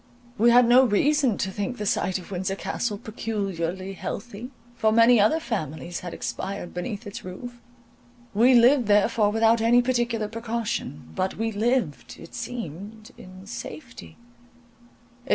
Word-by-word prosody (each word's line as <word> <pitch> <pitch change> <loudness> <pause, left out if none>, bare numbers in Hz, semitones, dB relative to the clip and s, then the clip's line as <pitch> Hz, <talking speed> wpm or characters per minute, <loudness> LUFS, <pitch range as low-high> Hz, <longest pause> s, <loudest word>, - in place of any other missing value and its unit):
We 235 +2 +6
had 245 0 +6
no 250 +2 +7
reason 260 +1 +2
to 190 - -2
think 205 +6 -4
the 210 - -4
site 190 -1 0
of 185 +1 -11
Windsor 190 +1 -2
Castle 210 +1 -3
peculiarly 195 -4 -4
healthy, 220 +4 -6 0.3
for 220 -2 +2
many 230 +1 +6
other 215 +11 +3
families 175 - -4
had 180 -2 -7
expired 190 0 -5
beneath 205 +5 -5
its 205 - -8
roof; 240 +7 -8 0.7
we 240 +5 +5
lived 245 0 +5
therefore 205 +1 +3
without 225 +1 +3
any 240 +2 +4
particular 240 -3 0
precaution; 225 - -4
but 185 - -2
we 225 +1 -1
lived, 215 - -1
it - - -13
seemed, 215 0 -7
in 185 +1 -13
safety. 235 +3 -9
220 Hz, 140 wpm, -25 LUFS, 195-240 Hz, 0.7 s, no